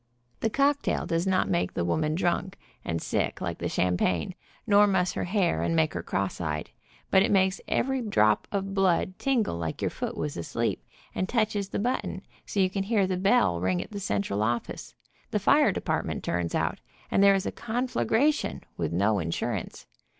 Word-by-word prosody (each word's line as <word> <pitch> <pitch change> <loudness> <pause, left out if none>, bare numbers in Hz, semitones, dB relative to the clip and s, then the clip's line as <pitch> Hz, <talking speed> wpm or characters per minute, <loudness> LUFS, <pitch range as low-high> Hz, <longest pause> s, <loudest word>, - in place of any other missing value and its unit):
The 225 - +1
cocktail 280 +4 +1
does 165 +3 0
not 185 -1 +2
make 90 +1 0
the 85 - 0
woman 155 - 0
drunk 185 +2 -1 0.3
and 85 -1 -2
sick, - - -1
like - - -4
the - - -2
champagne, 90 - 0 0.3
nor 205 -2 +6
muss 185 -2 +2
her - - -2
hair, 185 -2 +1
ami 165 - 0
make 160 -1 +2
her - - -3
cross 95 -2 -2
eyed, 75 -2 -3 0.4
but 190 - +6
it 200 - +2
makes 190 -1 +2
every 265 0 0
drop 110 - +2
of 195 -1 -2
blood 185 -1 +1
tingle 245 - +1
like 80 -2 -3
your - - -1
foot - - -4
was 150 -1 -3
asleep, 85 - -2 0.3
and 185 - -2
touches 215 -4 0
the - - -3
button 245 +5 -2 0.2
so 205 - -2
you 190 - +5
can 195 0 -2
hear 205 -2 +2
the 185 0 -1
bell 185 - +3
ring 90 -1 +1
at - - -6
the 205 - -5
central 100 - -1
office, 120 +2 -2 0.3
the - - 0
fire - - +4
department - - -2
turns 85 -1 -1
out, - - 0 0.3
and - - +3
there 200 0 +7
is 195 - -1
a - - -1
conflagration, 250 +4 0
with 80 -2 -2
no 100 +4 +2
insurance. 85 -1 -3
185 Hz, 185 wpm, -27 LUFS, -, 0.4 s, there